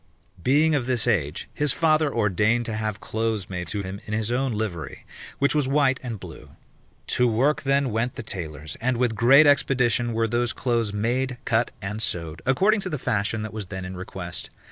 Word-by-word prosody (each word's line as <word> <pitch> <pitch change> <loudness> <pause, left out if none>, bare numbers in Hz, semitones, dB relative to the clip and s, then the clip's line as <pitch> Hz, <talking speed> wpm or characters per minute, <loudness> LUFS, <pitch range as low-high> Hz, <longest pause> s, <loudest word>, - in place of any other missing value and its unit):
Being 150 - +3
of 135 -5 0
this 125 -4 +2
age, 85 -10 0
his 150 -2 +1
father 155 -2 +2
ordained 110 +2 +1
to 115 - -3
have 110 -1 -3
clothes 110 -4 -2
made 90 -1 -4
to 105 -2 -2
him 95 +1 -6
in 105 - -4
his 110 +1 -1
own 130 +1 0
livery, 105 -9 -4 0.3
which 140 - +2
was 150 -3 +1
white 135 -1 +2
and 120 -5 -5
blue. 90 -4 -11 0.5
To 125 - +2
work 135 +7 +2
then 140 -2 +1
went 115 +3 -1
the - - -5
tailors, 80 -7 -4
and 125 +1 +1
with 120 -2 +1
great 130 +7 +6
expedition 125 -4 +2
were 115 0 +1
those 120 +1 0
clothes 115 -4 0
made, 120 +5 -1
cut, 115 +1 +2
and 105 +3 -3
sewed, 85 -6 -2
according 195 +11 +3
to 190 - -3
the 150 - -2
fashion 110 -2 -1
that 110 - -6
was 105 -3 -4
then 95 -1 -6
in 90 0 -6
request. 90 -1 -6
115 Hz, 195 wpm, -24 LUFS, 105-130 Hz, 0.5 s, great